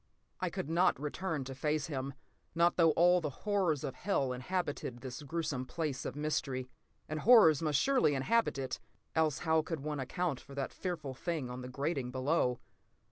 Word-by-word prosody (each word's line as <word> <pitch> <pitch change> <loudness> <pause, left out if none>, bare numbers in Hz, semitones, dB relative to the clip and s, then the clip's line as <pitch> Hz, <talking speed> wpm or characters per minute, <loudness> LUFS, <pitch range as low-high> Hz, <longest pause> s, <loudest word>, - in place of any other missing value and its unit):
I - - 0
could - - -4
not 170 -3 +3
return 150 +1 -2
to 135 +1 -6
face 150 +2 0
him, 135 -3 -4 0.4
not 170 +1 +4
though 165 -2 +5
all 175 +2 +5
the 150 - -1 0.2
horrors 190 -9 +1
of 135 - -3
hell 140 -10 0
inhabited 140 -3 -3
this 125 -1 -6
gruesome 150 -3 -2
place 150 -5 -3
of 125 - -4
mystery. 140 -4 -1 0.4
And 155 0 -3
horrors 205 - +7
must 150 -3 +2
surely 260 - +3
inhabit 180 +9 +2
it, 135 -1 -3 0.3
else 155 -4 +2
how 160 0 +4
could 160 -1 -4
one 150 0 -3
account 155 +2 -1
for 140 - -13
that 140 -1 -3
fearful 160 -7 -4
thing 145 -2 -3
on 125 +1 -6
the 125 - -7
grating 135 -1 -2
below? 130 -1 +1
150 Hz, 180 wpm, -33 LUFS, 135-170 Hz, 0.4 s, horrors